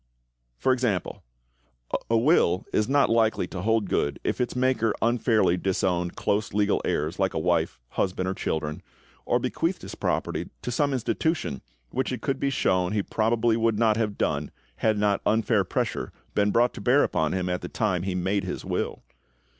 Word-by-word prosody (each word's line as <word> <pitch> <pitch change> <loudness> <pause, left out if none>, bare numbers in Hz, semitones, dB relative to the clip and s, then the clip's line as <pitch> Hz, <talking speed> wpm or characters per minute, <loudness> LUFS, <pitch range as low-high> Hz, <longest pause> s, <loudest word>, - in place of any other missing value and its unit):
For 130 - +2
example: 120 -8 -1 0.9
a 115 - +4
will 115 - +3
is 105 +3 +1
not 140 +1 +4
likely 115 -4 +2
to 90 0 -6
hold 110 0 +1
good 70 - 0
if - - -1
its 125 0 -1
maker 125 -3 +1
unfairly 110 -6 +2
disowned 90 -2 0
close 105 0 -1
legal 105 -1 +2
heirs, 75 +5 -1
like 95 -1 +1
a - - +1
wife, 85 -1 0
husband, 95 -1 -1
or 95 - 0
children, 80 -4 -3 0.5
or - - +3
bequeathed - - -2
his - - -7
property - - -2
to 125 - -3
some 145 +3 +1
institution 120 - -1 0.3
which 130 +1 -1
it 125 - -4
could 135 -1 -1
be 140 - +1
shown 95 -8 +1
he 105 -2 +1
probably 115 +2 +1
would 115 -1 +1
not 110 -1 +3
have 105 -2 -1
done - - -1 0.3
had 110 -1 +1
not 105 -1 +1
unfair 110 -1 +2
pressure - - -2 0.2
been 105 0 +2
brought 120 +3 +3
to 110 - -8
bear 125 +7 +4
upon 80 -1 0
him 90 -1 -1
at 90 0 -1
the 90 - -6
time 95 -6 0
he 95 0 -2
made 95 +2 0
his 90 - -5
will. - - -3
105 Hz, 180 wpm, -26 LUFS, 90-115 Hz, 0.9 s, a